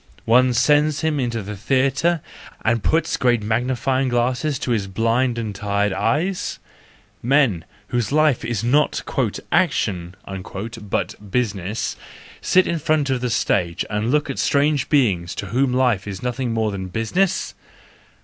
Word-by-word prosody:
One 125 +2 +4
sends 150 +4 +3
him 160 -2 0
into 120 -4 -2
the 105 +2 -6
theatre 135 - +1 0.4
and 115 0 +2
puts 160 0 +1
great 120 -4 +2
magnifying 130 +4 0
glasses 125 +4 0
to 125 - -3
his 105 -4 0
blind 115 +5 +1
and 110 -3 -3
tired 100 0 0
eyes? 175 - -1 0.6
Men, 125 - +2 0.2
whose 120 -1 -1
life 155 -3 +3
is 115 -3 -2
not 145 +6 +2 0.5
"action" 95 - 0 0.7
but 105 0 -4
business, 105 -2 -2 0.5
sit 185 0 +4
in 170 - -1
front 150 -2 +1
of 130 -2 0
the 125 - -1
stage 90 -7 0
and 105 +2 -1
look 150 +3 +2
at 135 - -4
strange 145 -1 +2
beings 100 - +2
to - - -4
whom 130 +3 +1
life 125 -6 +1
is 100 +1 -6
more 120 -3 -1
than 95 -2 -5
business? 165 - 0
125 Hz, 140 wpm, -21 LUFS, 105-140 Hz, 0.7 s, One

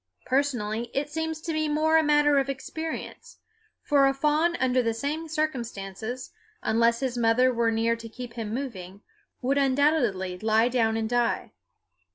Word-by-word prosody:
Personally 240 -4 -1
it 285 +2 -1
seems 320 0 -3
to 330 0 -3
me 310 -1 0
more 310 +2 +2
a 320 - +6
matter 295 -1 +4
of 275 0 -1
experience; 315 +4 -6 0.5
for 280 -2 +4
a 270 - +1
fawn 305 +4 +2
under 255 -2 +2
the 230 -2 -1
same 300 +7 -3
circumstances, 245 - -4 0.3
unless 230 +2 +2
his 250 -2 -2
mother 240 +3 +3
were 230 -1 +2
near 225 +1 +1
to 230 0 -9
keep 245 +1 -8
him 225 -3 -5
moving, 205 -7 -6 0.4
would 275 +3 +2
undoubtedly 260 - +1
lie 220 +3 +3
down 225 -3 +1
and 220 0 -1
die. 240 0 0
255 Hz, 160 wpm, -26 LUFS, 230-295 Hz, 0.5 s, a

